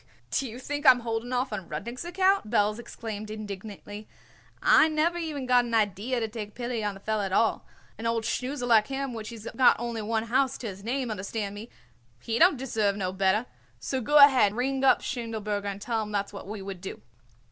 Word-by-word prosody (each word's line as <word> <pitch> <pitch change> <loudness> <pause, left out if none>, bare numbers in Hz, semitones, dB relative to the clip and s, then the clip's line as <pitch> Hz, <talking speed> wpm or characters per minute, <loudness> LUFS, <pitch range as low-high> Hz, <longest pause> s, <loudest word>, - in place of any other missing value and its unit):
"Do 265 -2 0
you 225 - -8
think 290 +3 -4
I 275 - +9
am 250 -1 +6
holding 230 +1 -3
off 255 +1 -1
on 185 - -5
Rudnik's 235 +7 -5
account?" 375 - +1
Belz 210 -1 +2
exclaimed 220 -3 -7
indignantly. 210 0 -8 0.5
"I - - +6
never 320 +3 +1
even 305 -5 -4
got 250 -1 +4
an 235 -1 -2
idee 210 +1 0
to 225 - -1
take 210 -2 -7
pity 240 -2 -3
on 205 -1 -2
the - - -11
feller 215 0 -1
at 190 - -4
all. 225 +3 +1 0.3
An 230 - -2
old 230 -1 0
snoozer 255 +2 -2
like 225 -3 +4
him 270 -1 -3
which 220 -2 -6
he's 230 -1 -9
got 260 - +5
only 235 -1 -3
one 220 +1 -1
house 260 +3 +1
to 235 - -6
his 195 -1 -8
name, 250 +1 -2
understand 200 0 -4
me, 210 +3 -9 0.5
he 225 - -2
don't 345 -3 +6
deserve 220 -6 0
no 185 -2 -2
better. 195 +4 +2 0.3
So 265 -1 -2
go 295 +6 +3
ahead 265 -8 +7
and - - -9
ring 265 +2 0
up 270 - +5
Schindelberger 220 -5 -3
and 200 0 -4
tell 225 +1 -1
him 210 -1 -5
that's 200 0 -2
what 200 - -8
we 205 -1 -6
would 190 -2 -7
do." 190 - -8
225 Hz, 215 wpm, -27 LUFS, 210-255 Hz, 0.5 s, I